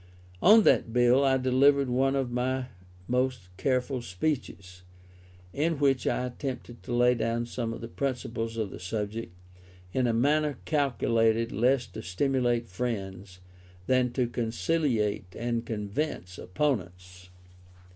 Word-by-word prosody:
On 215 +3 +7
that 115 - +3
bill 125 +3 +4
I 135 -1 +3
delivered 135 +2 +3
one 135 +2 +2
of 135 -3 -1
my 130 +1 -1 0.4
most 125 -7 -1
careful 125 +4 0
speeches, 90 - -4 0.7
in 160 +2 0
which 135 -3 +2
I 125 - 0
attempted 125 -1 -6
to - - -8
lay 125 +1 +5
down 115 0 -1
some 115 -1 -4
of 115 - -7
the 115 - -5
principles 120 -3 -3
of 110 -3 -2
the - - -8
subject, 105 +2 -4 0.6
in 130 -1 +1
a - - +2
manner 145 +5 +2
calculated 115 -6 +1
less 125 +4 +2
to 110 - -9
stimulate 120 +4 0
friends, 95 -4 -5 0.4
than 125 0 +2
to 125 - +1
conciliate 115 - -1
and 120 0 -2
convince 105 - -3
opponents. 90 - -3
120 Hz, 130 wpm, -28 LUFS, 110-130 Hz, 0.7 s, On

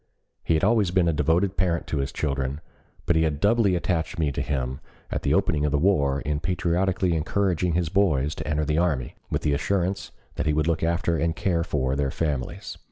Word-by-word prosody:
He 80 - +2
had 80 - 0
always 105 -2 +3
been 90 -1 +2
a 85 - +2
devoted 85 +6 +1
parent 85 -3 0
to 75 - -2
his 70 - -2
children, 70 -1 -2 0.5
but 85 - +2
he 80 - +3
had 75 -3 0
doubly 105 0 +3
attached 85 -1 -1
me 75 -3 +1
to - - -3
him 65 -2 -2 0.3
at - - -2
the - - +2
opening 75 -2 +1
of 75 - +1
the 75 - +2
war 70 -5 +2
in 75 -1 -2
patriotically 90 +1 0
encouraging 90 +1 0
his 85 -1 0
boys 75 -7 +2
to - - -7
enter 75 0 0
the 75 +2 +1
army, 75 -8 0 0.2
with - - -2
the 75 - +2
assurance 95 +5 -1 0.3
that - - -1
he 75 - +2
would 75 0 +1
look 85 -1 0
after 85 0 +1
and 80 0 0
care 85 -2 0
for 65 -5 -1
their 70 -1 0
families. 70 -3 -3
80 Hz, 215 wpm, -25 LUFS, 75-90 Hz, 0.5 s, always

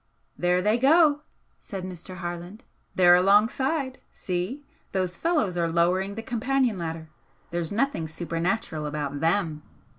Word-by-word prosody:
"There 180 +1 +1
they 215 +4 +2
go!" 295 +2 +5 0.4
said 195 -4 -7
Mr. 185 0 -8
Harland 175 +4 -6 0.3
"They're 175 -1 +7
alongside! 245 - +3
See! 185 +11 -4 0.3
those 185 -2 -1
fellows 295 - 0
are 170 -1 +1
lowering 180 +4 +1
the 225 - -5
companion 250 -3 0
ladder 160 -1 -5 0.4
there's 170 -1 -2
nothing 220 - 0
supernatural 165 0 -2
about 145 -1 -3
THEM! 165 -2 0
185 Hz, 125 wpm, -26 LUFS, 170-230 Hz, 0.4 s, They're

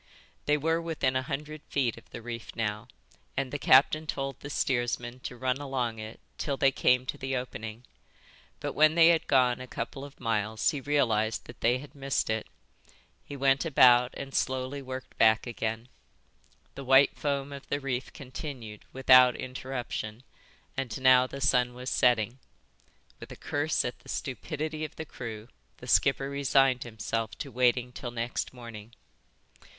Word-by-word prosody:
They 150 0 +4
were 165 +3 +1
within 155 -6 -1
a 130 - +2
hundred 150 +3 -5
feet 130 -5 0
of - - -16
the 115 - -9
reef 115 -1 -7
now 105 -2 -2 0.5
and 135 -2 -1
the 145 - -2
captain 150 +5 +5
told 135 -2 -3
the 145 - -8
steersman 120 -2 -1
to 125 0 -7
run 130 +1 0
along 130 -5 -2
it 110 +1 -8 0.2
till 140 -2 -2
they 135 - +4
came 125 -1 +3
to - - -5
the 130 0 -2
opening. 120 -2 -6 0.7
But - - -4
when 155 +1 +5
they 165 -1 +7
had 165 -1 +2
gone 125 -2 +3
a 130 - -7
couple 125 +3 -5
of 145 0 -11
miles 110 -2 -1
he 145 - -4
realised 115 -7 +1
that 120 - -13
they 120 +2 +3
had 140 +1 -11
missed 135 -5 -1
it. 110 0 -2 0.8
He 140 - -8
went 135 0 +3
about 125 -5 +5
and 135 0 -7
slowly 130 +2 -1
worked 130 -1 -8
back 110 -1 +5
again. 115 -1 -3 0.9
The 140 - -8
white 135 +1 +5
foam 140 -1 -2
of 140 - -9
the 140 - 0
reef 130 -2 -3
continued 130 -6 -8
without 130 -1 +6
interruption 125 -3 -5 0.5
and 135 -4 -3
now 130 -1 +6
the 140 +1 -8
sun 125 -2 +2
was 125 +1 -5
setting. 120 0 +2 0.8
With - - -10
a - - -7
curse 145 +2 -1
at 120 - -4
the - - -17
stupidity 155 +3 -4
of 155 - -6
the 160 - -6
crew 115 -6 -7 0.3
the - - -11
skipper 135 0 +3
resigned 135 -2 +2
himself 110 -2 -3
to 140 - -6
waiting 125 0 +2
till 125 0 -6
next 120 0 -3
morning. 115 -3 -10
130 Hz, 165 wpm, -29 LUFS, 120-140 Hz, 0.9 s, they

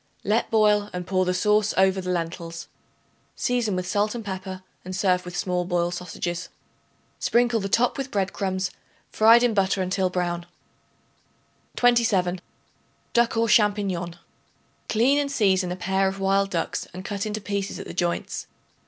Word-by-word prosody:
Let 215 +3 +1
boil 210 -2 +3
and 180 0 -4
pour 185 0 +1
the 180 - +1
sauce 210 +2 +2
over 190 0 +3
the 180 - -5
lentils. 170 -1 -4 0.7
Season 240 -5 0
with 185 0 -2
salt 205 +4 0
and 230 -3 -6
pepper, 190 -1 -6 0.2
and 185 +1 -6
serve 180 -1 +1
with 180 0 -6
small 180 -2 0
boiled 175 -1 0
sausages. 180 0 -4 0.7
Sprinkle 240 -1 +2
the 195 -1 -3
top 245 +6 +2
with 270 0 -3
bread 195 -5 -1
crumbs 190 -2 -2 0.4
fried 230 +2 +6
in 240 -2 +3
butter 195 -1 +1
until 185 0 0
brown. 175 -1 -2 1.3
27. 210 -7 +2 0.7
Duck 235 -1 +2
aux 230 - +3
Champignons. 200 -6 +2 0.7
Clean 255 +6 +3
and 285 -1 -1
season 190 -8 +2
a - - -2
pair 190 +1 +1
of 195 +1 -3
wild 195 0 +2
ducks 170 -3 -2
and 185 +1 -7
cut 205 +1 -3
into 215 0 -3
pieces 200 -1 -3
at - - -7
the - - -7
joints. 175 -1 -2
195 Hz, 160 wpm, -25 LUFS, 180-215 Hz, 1.3 s, fried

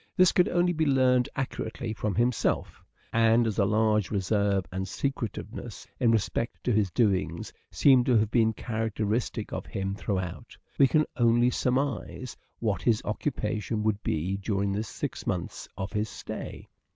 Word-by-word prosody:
This 185 -1 +6
could 180 - +3
only 175 0 +2
be 160 -1 +1
learnt 130 -2 +3
accurately 120 -3 -3
from 105 -2 -2
himself, 120 0 0 0.3
and 115 +1 +4
as 110 -1 -1
a 100 - +4
large 105 -1 +2
reserve 100 -1 +1
and 95 +1 -3
secretiveness 120 0 -4
in 120 - +3
respect 115 +1 0
to 125 - +1
his 105 -3 +2
doings 95 -4 0 0.2
seem 130 -3 +5
to 125 -3 +4
have 110 0 +1
been 110 -2 +4
characteristic 110 0 -2
of - - -4
him 95 0 -3
throughout, 95 -4 -4 0.2
we 135 - +7
can 155 +2 +3
only 120 0 +4
surmise 130 -1 -1 0.2
what 105 -4 -1
his 115 -3 +2
occupation 105 -2 -2
would 110 -1 0
be 90 +5 -1
during 100 0 -1
the 100 +2 -1
six 110 - -5
months - - -3
of 95 +2 -4
his 105 0 -1
stay. - - -7
110 Hz, 155 wpm, -28 LUFS, 100-125 Hz, 0.3 s, we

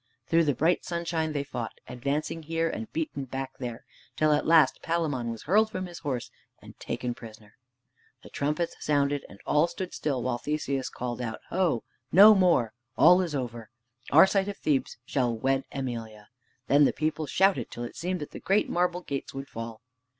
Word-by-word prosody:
Through 165 0 +3
the 145 -3 +1
bright 170 +3 +2
sunshine 170 -2 -2
they 145 -2 -1
fought, 120 -5 -5
advancing 140 +6 -2
here, 165 +1 -1
and 110 -8 -5
beaten 150 -4 -3
back 135 +1 -6
there, 120 -2 -6 0.3
till 155 0 +3
at 150 - 0
last 165 -1 +5
Palamon 150 -8 -1
was 115 -1 -6
hurled 215 +6 +3
from 185 -3 -4
his 175 -1 -9
horse 130 -6 -3 0.3
and - - -14
taken 125 -1 -3
prisoner. 110 -3 -13 0.7
The - - -13
trumpets 150 +4 -1
sounded, 145 -1 +1
and 100 - -14
all 150 +3 +3
stood 175 +2 -6
still 135 -5 -2
while 120 -1 -1
Theseus 140 -2 -2
called 125 0 -5
out, 110 -2 -4
"Ho! 175 -9 +1 0.3
no 205 +4 +9
more. 170 - +3 0.2
All 180 +3 +7
is 170 -5 -2
over. 120 -4 -4 0.4
Arcite 190 +6 +6
of 205 - -4
Thebes 145 -4 0
khall 125 -4 0
wed 135 +3 0
Emelia." 115 -6 -5 0.4
Then 145 +2 +5
the - - +2
people 155 0 -2
shouted 190 +7 +2
till 120 - -6
it 120 - -7
seemed 180 0 -3
that 150 - -6
the - - -8
great 200 +2 +2
marble 180 0 0
gates 140 -6 -5
would 135 0 -5
fall. 115 0 -7
145 Hz, 180 wpm, -28 LUFS, 125-170 Hz, 0.7 s, no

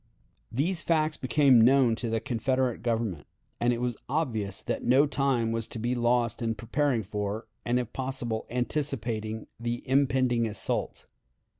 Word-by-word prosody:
These 160 +9 0
facts 155 -2 +1
became 130 -2 +4
known 125 0 +5
to 120 - -3
the 115 0 0
Confederate 125 +1 -1
Government, 110 - -2 0.3
and 120 +1 +2
it 120 - -1
was 120 -2 -2
obvious 110 - -1
that - - -3
no 130 +4 +5
time 135 -5 +1
was 115 -1 -1
to - - -6
be 120 +3 -1
lost 120 -2 +1
in 115 -1 -1
preparing 120 +2 0
for, 105 +2 -3 0.2
and 120 +1 +2
if 120 -2 -3
possible 130 -4 -3
anticipating 120 -4 -2
the 120 +1 -4
impending 130 -3 +2
assault. 105 - -3
120 Hz, 150 wpm, -28 LUFS, 115-135 Hz, 0.3 s, known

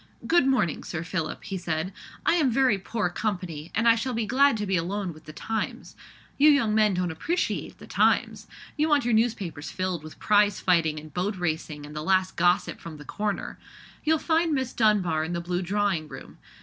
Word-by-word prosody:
"Good 335 -5 +4
morning, 245 - +1
Sir 165 -2 -4
Philip," 165 -2 -4
he 190 -2 -4
said; 170 +2 -2 0.3
"I - - +4
am 315 -6 +3
very 250 -4 +3
poor 210 +1 -2
company, 175 -6 -3
and 225 +2 +2
I 230 - +8
shall 230 +2 -2
be 230 -1 0
glad 270 +2 +4
to 210 - -2
be 190 -1 0
alone 180 +1 -2
with 155 - -16
the 155 - -9
Times. 220 +7 -4 0.4
You 300 +2 +7
young 275 -8 +3
men 215 -3 +3
don't 180 -1 -1
appreciate 335 - -2
the - - -12
Times. - - +1 0.3
You 310 +1 +1
want 290 -4 +3
your 240 - +1
newspapers 210 -9 0
filled 185 -4 -3
with 155 - -11
prize 205 0 +3
fighting 165 -4 +2
and 155 0 -13
boat 195 +4 -1
racing, 160 -3 -3
and 150 +1 -11
the 150 - -3
last 185 +2 +1
gossip 175 +3 +2
from 165 -2 -9
'the 150 - -11
Corner.' 205 +4 -3 0.4
You'll 320 +1 +3
find 325 +1 +1
Miss 260 -2 -2
Dunbar 190 -8 +2
in 165 +2 -4
the 170 - -1
blue 175 +1 -2
drawing 190 -4 0
room. - - -11
190 Hz, 200 wpm, -26 LUFS, 170-230 Hz, 0.4 s, I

